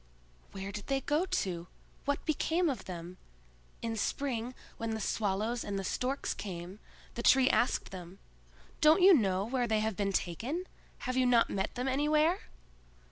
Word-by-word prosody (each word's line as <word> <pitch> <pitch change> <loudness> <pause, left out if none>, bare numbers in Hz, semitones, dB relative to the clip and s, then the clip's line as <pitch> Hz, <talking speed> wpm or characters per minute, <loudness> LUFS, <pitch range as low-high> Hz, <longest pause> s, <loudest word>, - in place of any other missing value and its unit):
Where 195 0 -5
did 205 0 -7
they 270 0 +1
go 305 +7 +1
to? 175 - -2 0.4
What 285 0 -1
became 325 +2 +1
of 260 - -6
them? 175 0 -7 0.7
In 230 -1 -1
spring, 245 +1 -2 0.2
when 225 -1 -2
the - - -3
Swallows 215 +3 -1
and 200 -1 -3
the 195 - -2
Storks 255 +8 -1
came, 185 0 -7 0.3
the 235 - -4
Tree 260 +2 +5
asked 245 - +1
them: 180 0 -9 0.6
"Don't 315 +4 +6
you 385 +1 +9
know 195 - +2
where 245 +1 0
they 215 -1 +2
have 220 -1 -1
been 200 0 0
taken? 235 - -2 0.4
Have 255 0 -1
you 255 -1 +4
not 235 -2 +4
met 195 +4 -2
them 250 +1 -2
anywhere?" 300 +6 +3
230 Hz, 165 wpm, -32 LUFS, 195-275 Hz, 0.7 s, you